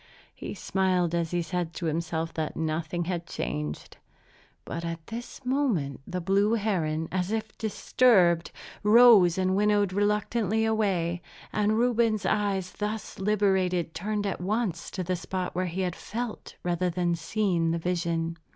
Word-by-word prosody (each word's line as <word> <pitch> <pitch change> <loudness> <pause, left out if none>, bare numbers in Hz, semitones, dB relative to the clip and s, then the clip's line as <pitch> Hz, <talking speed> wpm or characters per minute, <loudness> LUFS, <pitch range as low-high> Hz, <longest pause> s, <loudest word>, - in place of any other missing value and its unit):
He - - -7
smiled 185 -3 +1
as 170 -1 0
he 175 0 -1
said 170 0 -3
to 175 - -4
himself 165 0 -2
that 155 -2 -3
nothing 160 +2 -2
had 175 -1 -3
changed. 75 +4 -4 0.7
But 170 - -5
at 165 -1 -5
this 240 +4 -8
moment 230 - 0
the 180 - -3
blue 200 +4 +2
heron, 165 -8 -1
as 185 +1 -1
if 220 -1 -3
disturbed, 200 -5 +3 0.3
rose 210 -5 +7
and 185 0 +1
winnowed 205 -1 +2
reluctantly 210 +1 +1
away; 190 -6 0 0.3
and 215 +1 +2
Reuben's 230 -4 +2
eyes, 195 -2 0
thus 210 -1 -4
liberated, 190 -4 +1
turned 205 +2 -2
at 195 -3 -2
once 195 -3 -1
to 185 - -4
the 185 +1 -1
spot 180 +1 -4
where 185 +1 -1
he 180 +2 -3
had 180 -1 -1
felt, 235 0 -6
rather 180 +1 0
than 175 0 0
seen, 175 -2 0
the 165 - +1
vision. 170 -1 -1
185 Hz, 150 wpm, -27 LUFS, 170-210 Hz, 0.7 s, rose